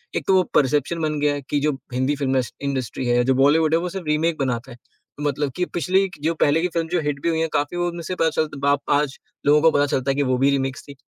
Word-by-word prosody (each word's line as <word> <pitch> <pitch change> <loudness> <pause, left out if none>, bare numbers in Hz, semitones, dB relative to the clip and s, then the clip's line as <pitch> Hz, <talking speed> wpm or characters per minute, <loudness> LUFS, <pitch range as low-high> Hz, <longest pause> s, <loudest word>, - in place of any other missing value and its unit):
एक - - -1
तो 195 - +4
वो 185 - +4
परसेप्शन 150 +4 +1
बन 155 -1 -1
गया 145 0 +2
है 145 - -4
कि 145 - +1
जो 150 +1 +1 0.2
हिंदी 130 +3 0
फ़िल्म 135 -2 +1 0.3
इंडस्ट्री 130 -2 -3
है, 120 0 +3
जो 130 - +3
बॉलीवुड 155 +3 +4
है 165 - +4
वो 180 +1 -3
सिर्फ 185 -1 -6
रीमेक 155 +2 +1
बनाता 130 -1 -2
है। 120 - -11 0.4
मतलब 145 -1 -1
कि 180 - 0
पिछले 185 +5 +2 0.2
जो 165 - +1
पहले 150 +3 +3
की 180 - +1
फ़िल्म 165 -1 -1
जो 175 +1 +1
हिट 145 -1 -2
भी 170 - +2
हुई 160 -1 0
हैं, 165 0 0
काफ़ी 145 +4 -1
वो 175 0 0
उनमें 170 0 -5
से 185 +3 -4
पता 165 -2 +2
चलता 155 -2 -2
है - - -8
बाद 140 0 +2 0.2
आज 145 -2 -3 0.3
लोगों 150 +1 +5
को 160 +1 +5
पता 145 -1 +2
चलता 135 -1 0
है - - -2
कि 145 - +1
वो 130 - +2
भी 140 - +5
रिमिक्स 135 -1 -2
थी, 140 - -10
145 Hz, 280 wpm, -22 LUFS, 140-165 Hz, 0.4 s, लोगों